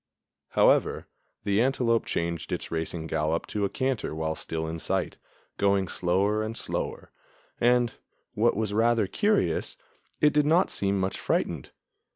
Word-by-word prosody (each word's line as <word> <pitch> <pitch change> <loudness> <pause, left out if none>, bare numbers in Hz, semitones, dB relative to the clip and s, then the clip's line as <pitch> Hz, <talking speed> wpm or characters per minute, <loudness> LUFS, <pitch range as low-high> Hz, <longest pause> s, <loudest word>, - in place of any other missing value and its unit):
However, - - +3 0.4
the 100 +2 +2
antelope 120 -3 +2
changed 85 -1 -2
its - - -3
racing 80 0 -3
gallop 80 +1 -1
to 105 -1 -1
a - - -1
canter 130 -9 -2
while 80 0 -1
still 80 0 -4
in 80 +1 -4
sight, - - -2 0.4
going 100 -1 +2
slower 95 +5 +1
and 110 +1 -4
slower, - - -4 0.5
and, 120 0 +3 0.4
what 115 +3 +2
was 105 -2 -1
rather 115 0 +3
curious, 150 - 0 0.4
it 150 -1 +4
did 150 0 +3
not 165 +4 +3
seem 100 0 0
much 95 0 -2
frightened. - - -1
100 Hz, 145 wpm, -27 LUFS, 85-120 Hz, 0.5 s, it